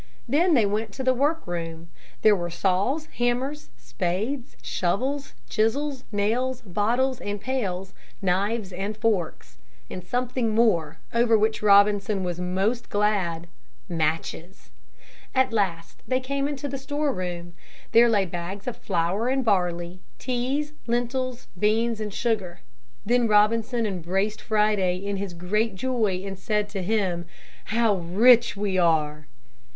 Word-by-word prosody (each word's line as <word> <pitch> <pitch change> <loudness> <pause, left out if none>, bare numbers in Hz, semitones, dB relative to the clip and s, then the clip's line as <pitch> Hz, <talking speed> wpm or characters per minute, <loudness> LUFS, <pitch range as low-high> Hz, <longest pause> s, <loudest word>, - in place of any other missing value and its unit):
Then 330 +3 +3
they 230 -5 +4
went 210 +2 -1
to 265 - -5
the 260 0 +4
work 290 +6 0
room. 165 -1 -5 0.3
There 215 -1 +7
were 175 -2 -3
saws, 195 - 0
hammers, 255 +5 -1
spades, 175 - -3
shovels, 225 - -1
chisels, 255 - 0
nails, 235 +5 0
bottles, 235 +6 0
and 205 0 -3
pails, 195 -7 -3 0.3
knives 195 +2 0
and 200 +4 -4
forks. 210 -8 -1 0.3
And 180 - -6
something 245 +1 -1
more, 170 -9 +2 0.2
over 235 -1 +4
which 220 +1 +1
Robinson 205 -1 +4
was 175 -1 -3
most 195 +7 -1
glad, 195 -5 0 0.4
matches. 165 +2 -3 0.6
At 260 -2 +3
last 175 -6 -1
they 255 0 +1
came 275 +2 -1
into 285 0 -4
the 275 -1 -4
store 290 +1 -1
room. 175 -2 -5 0.4
There 235 +1 +6
lay 205 -4 +3
bags 180 +3 -6
of 250 - -4
flour 190 +5 0
and 265 0 +1
barley, 180 -3 0 0.2
teas, 265 +4 -2
lentils, 245 +1 -1
beans 220 +2 +1
and 210 -1 -3
sugar. 200 -6 -2 0.4
Then 240 +2 +3
Robinson 225 +3 +3
embraced 195 +2 -1
Friday 210 -4 +2
in 200 +1 -3
his 195 -3 -5
great 205 +5 0
joy 215 -5 0
and 195 -1 -6
said 210 +1 -1
to 200 -2 -4
him, 180 -4 0 0.4
"How 225 -2 +2
rich 220 +6 +4
we 200 -2 0
are!" 155 -3 +1
210 Hz, 135 wpm, -25 LUFS, 180-240 Hz, 0.6 s, There